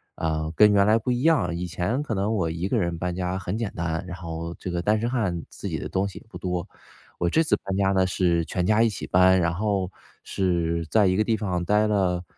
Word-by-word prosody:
呃， 80 -1 -2
跟 105 +3 +6
原 100 0 +4
来 110 +1 +5
不 115 +3 -2
一 120 0 0
样。 130 - +2
以 90 +1 -3
前 90 - -1
可 135 -7 -3
能 100 +3 0
我 95 -7 0
一 85 +3 -3
个 115 +3 +1
人 85 -3 -1
搬 90 +1 -3
家 90 0 -2
很 90 +1 -4
简 110 -2 -3
单， 85 -1 -2
然 90 0 -6
后 85 -1 -6
这 90 - -5
个 85 0 -1
单 105 +4 +2
身 115 - -1
汉 95 -10 -1
自 - - -8
己 - - -2
的 - - -5
东 95 +1 -1
西 100 - -9
也 - - -21
不 90 -5 -10
多。 90 -2 -3 0.5
我 85 - +1
这 160 - +3
次 155 - +2
搬 95 0 -2
家 95 -1 +2
呢 95 -1 +2
是 85 -2 +1
全 90 +3 -2
家 105 +3 +3
一 115 - +4
起 105 - -6
搬， 95 +1 +4
然 85 -1 +1
后 100 -1 -1 0.3
是 85 -3 -1
在 110 -2 +4
一 95 -1 +3
个 105 - +2
地 110 0 0
方 90 -4 -2
待 105 +4 +2
了 95 -4 +1
95 Hz, 275 characters per minute, -25 LUFS, 85-105 Hz, 0.5 s, 跟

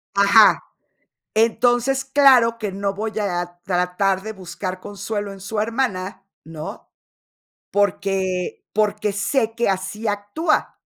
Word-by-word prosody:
Ajá. 200 +2 +6 0.7
Entonces, 240 +4 +2
claro 260 -4 +5
que 210 -3 -3
no 200 0 -2
voy 220 +1 -3
a 175 -3 -3
tratar 185 +1 0
de 220 +1 -5
buscar 185 -1 -6
consuelo 205 0 -5
en 195 - -12
su 210 +3 -5
hermana, 215 -5 -2 0.2
¿no? 160 -1 -8 0.8
Porque 190 -2 0
porque 210 0 0
sé 225 +3 0
que 235 -2 0
así 195 +3 -2
actúa. 205 +11 -1
205 Hz, 115 wpm, -21 LUFS, 190-225 Hz, 0.8 s, Ajá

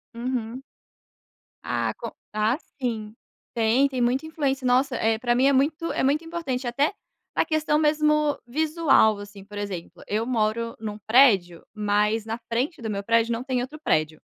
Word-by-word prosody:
Uhum. 245 +1 -3 1.0
Ah, - - -1
com - - -6 0.2
ah, 215 +5 +1 0.2
sim. 220 -3 -3 0.4
Tem 235 +4 +3
tem 260 -3 -3
muita 250 +5 +1
influência. 280 -4 -2
Nossa, 255 +2 +2
eh, 225 -1 +1
pra 240 0 +1
mim 255 - +3
é 280 - +5
muito 305 +5 +1
é - - -1
muito 290 +4 +2
importante 300 -7 -3
até 280 +9 +1 0.4
na - - +2
questão 310 -1 +1
mesmo 300 -1 +2
visual, 300 -7 +3
assim. 205 -1 -10
Por 205 +1 -11
exemplo, 195 -4 -6
eu 215 +3 -1
moro 230 -1 -1
num 215 -1 -5
prédio, 200 -7 +4
mas 210 +1 +1
na 225 +1 -3
frente 255 +6 -1
do 220 - -4
meu 200 -1 -3
prédio, 230 +1 +2
não 230 - -3
tem 255 -2 -1
outro 295 +5 -7
prédio. 155 0 0
240 Hz, 165 wpm, -25 LUFS, 215-280 Hz, 1.0 s, é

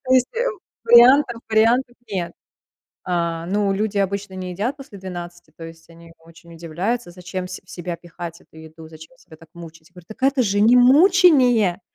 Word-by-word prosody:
То 260 - -1
есть, 255 -1 +4
э, - - -1 0.4
вариантов 240 0 +5
вариантов 235 +3 +2 0.2
нет. 180 -4 -4 0.7
А, 170 -2 -3
ну, 200 +1 0
люди 205 +1 -3
обычно 200 0 -3
не 185 -1 -6
едят 220 +10 -3
после 250 -7 -13
12. 175 -2 -9
То 165 - -10
есть 165 0 -13
они 165 0 -16
очень 165 +1 -18
удивляются, 175 +7 -4
зачем 180 +1 -7
в - - -13
се 185 - -8
в 185 - -19
себя 175 -1 -6
пихать 170 0 -10
эту - - -23
еду, 160 0 -13
зачем 160 +10 -15
себя 160 - -17
так 165 0 -19
мучить. 165 0 -14
Говорю: 180 -2 -16
"Так 220 - -13
это 270 -1 +2
же 205 -2 0
не 230 +4 +5
мучение, 255 - +4
185 Hz, 185 wpm, -20 LUFS, 170-235 Hz, 0.7 s, вариантов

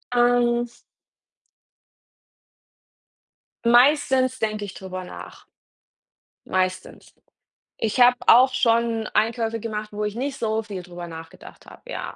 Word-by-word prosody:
Ähm 240 0 +3 3.0
meistens 255 +1 +4
denke 215 -1 -2
ich 195 - -9
drüber 185 -1 -7
nach. - - -11 1.0
Meistens. 185 0 -3 0.7
Ich 225 +3 -1
habe 245 0 +7
auch 255 +3 +6
schon 230 -2 +1
Einkäufe 225 0 0
gemacht, 215 -1 -5
wo 210 +1 -4
ich 210 +1 -3
nicht 275 +2 -3
so 220 0 -1
viel 200 -4 -7
drüber 175 -1 -9
nachgedacht 165 0 -12
habe, - - -15
ja. - - -6
225 Hz, 110 wpm, -23 LUFS, 205-240 Hz, 3.0 s, habe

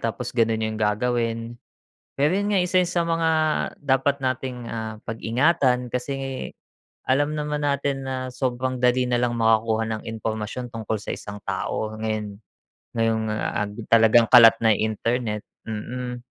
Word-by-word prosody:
Tapos 120 +2 -3
ganun 115 -2 +1
yung 110 0 -3
gagawin. 115 +2 -1 0.5
Pero 145 +3 +2
yun 205 +1 0
nga, 195 - +4
eh, - - +1
isa 185 - +2
yan 180 -1 +2
sa 175 - +1
mga 165 -1 +1 0.5
dapat 140 0 +1
nating, 130 -2 -3
ah, 110 -1 -4
pag-ingatan. 125 +2 +1
Kasi 125 +3 -3 0.9
alam 145 +3 +1
naman 150 0 -2
natin 140 -1 0
na 130 0 -3 0.2
sobrang 130 0 -2
dali 125 0 +3
na 120 -1 +1
lang 120 -1 0
makakuha 110 0 +2
ng 110 - -5
impormasyon 110 +2 -4
tungkol 110 -1 -2
sa 105 - -5
isang 105 0 -7
tao 110 0 -2
ngayon. 110 -2 -3 0.6
Ngayong, 115 -1 +1
ah, 105 -1 -2
ag 105 - -11 0.2
talagang 115 +1 +6
kalat 115 -2 +9
na 110 - +6
internet, 110 +1 -1 0.2
mm. 125 +3 -4
120 Hz, 150 wpm, -24 LUFS, 110-130 Hz, 0.9 s, kalat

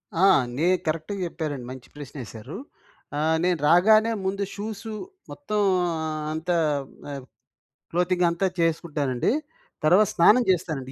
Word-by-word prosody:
ఆ! 175 +4 +4 0.3
నే 160 +4 +2 0.2
కరెక్ట్‌గా 160 +5 -2
చెప్పారండి. 150 -6 -5
మంచి 130 -1 -10
ప్రశ్న 145 -2 -10
వేశారు. 115 - -9 0.6
ఆహ్, 160 +2 +2
నేను 180 -1 +2
రాగానే 215 +7 +5
ముందు 200 +1 -1
షూస్సు, 215 +1 -6 0.4
మొత్తం 215 -8 -3 0.7
అంతా 165 +3 -1 0.6
ఆహ్, 135 -2 -6 0.7
క్లోతింగ్ 180 +1 +2
అంతా 170 +3 0
చేసుకుంటానండి. 155 - 0 0.5
తర్వాత 195 +6 +5
స్నానం 215 +9 +5
చేస్తానండి. 155 -7 -2
170 Hz, 115 wpm, -25 LUFS, 150-195 Hz, 0.7 s, రాగానే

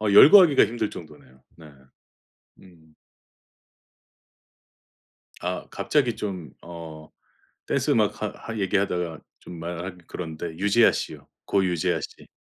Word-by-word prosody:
어 105 -1 0
열거하기가 155 - +8
힘들 115 -2 -2
정도네요. 75 -6 -13
네. 80 -2 -14 0.9
음. 80 -4 -20 2.5
아 90 0 -4
갑자기 130 -6 0
좀 95 -6 -6
어 80 -2 -10 0.6
댄스 - - 0
음악 - - +1
하 - - 0
하 115 -1 -8
얘기하다가 90 -4 -1 0.2
좀 85 - -11
말하기 85 +2 -6
그런데 80 -1 -6
유재하씨요. 105 +4 +1 0.2
고 95 -1 +1
유재하씨. 85 -3 -2
90 Hz, 230 characters per minute, -24 LUFS, 80-100 Hz, 2.5 s, 열거하기가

